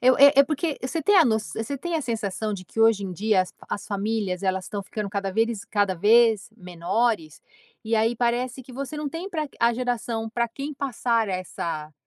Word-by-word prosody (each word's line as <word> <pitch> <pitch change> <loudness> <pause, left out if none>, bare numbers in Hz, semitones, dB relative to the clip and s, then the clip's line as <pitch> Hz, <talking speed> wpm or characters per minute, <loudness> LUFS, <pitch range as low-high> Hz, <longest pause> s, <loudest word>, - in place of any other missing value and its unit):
eu 255 +1 +5
é 280 0 +9
é - - +9
porque 305 +1 -2
você 260 +6 -2
tem 410 +7 +4
a 350 - +8
noç 220 -4 0
você 245 +5 -3
tem 345 +3 -3
a 320 - +1
sensação 220 -4 -2
de 185 -2 -6
que 225 - -5
hoje 225 -3 +4
em 185 - -4
dia 205 +1 +2
as 180 - -11
as 200 - -4
famílias 200 -2 -2
elas 190 -1 0
estão 205 0 -5
ficando 210 +1 -5
cada 200 -1 -2
veriz 225 0 0
cada 205 -3 +1
vez 220 +3 +4
menores 180 -1 -1 0.4
e 225 - 0
aí 225 +2 +2
parece 245 +2 -1
que 255 - -13
você 275 +3 -5
não 300 -1 -3
tem 335 +7 -6
pra 310 -4 -2
a 235 0 +4
geração 235 -2 -2
para 235 0 -1
quem 280 +5 -6
passar 235 -5 0
essa 170 -4 -4
225 Hz, 210 wpm, -25 LUFS, 200-255 Hz, 0.4 s, é